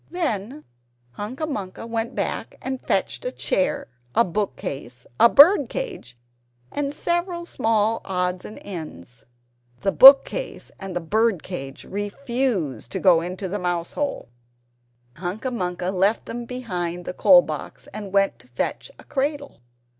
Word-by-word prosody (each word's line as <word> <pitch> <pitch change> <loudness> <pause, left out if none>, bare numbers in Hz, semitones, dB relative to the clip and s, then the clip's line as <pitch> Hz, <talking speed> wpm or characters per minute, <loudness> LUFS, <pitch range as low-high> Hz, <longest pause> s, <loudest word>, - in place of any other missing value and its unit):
Then 285 - -3 0.5
Hunca 230 - -5
Munca 205 -9 -5
went 230 +1 -3
back - - -3
and 265 -1 -4
fetched - - -1
a - - -2
chair, 185 - -1 0.3
a 230 - +6
book 200 +3 -2
case, 125 -2 -7
a 235 - +8
bird 320 - +7
cage, 430 - -6 0.5
and 285 -1 -2
several 345 +3 -2
small 225 -6 +1
odds 180 -1 -2
and 215 - -9
ends. 150 - -9 0.6
The 195 - +1
book 270 +4 +10
case - - -6
and 195 -2 -6
the 175 - -1
bird 210 +2 +1
cage 135 -7 -7
refused 205 - -2
to - - -1
go 175 -4 +5
into 185 +3 -4
the 205 +3 -3
mousehole. 175 - -2 0.9
Hunca 190 +9 -4
Munca 180 -4 -2
left 195 +4 +1
them 240 0 -5
behind 180 -8 -4
the - - -4
coal 265 +5 +7
box, - - -7
and 205 -2 -6
went 195 0 +2
to 125 - -19
fetch 125 - -3
a - - -14
cradle. 285 - -3
205 Hz, 145 wpm, -23 LUFS, 180-265 Hz, 0.9 s, book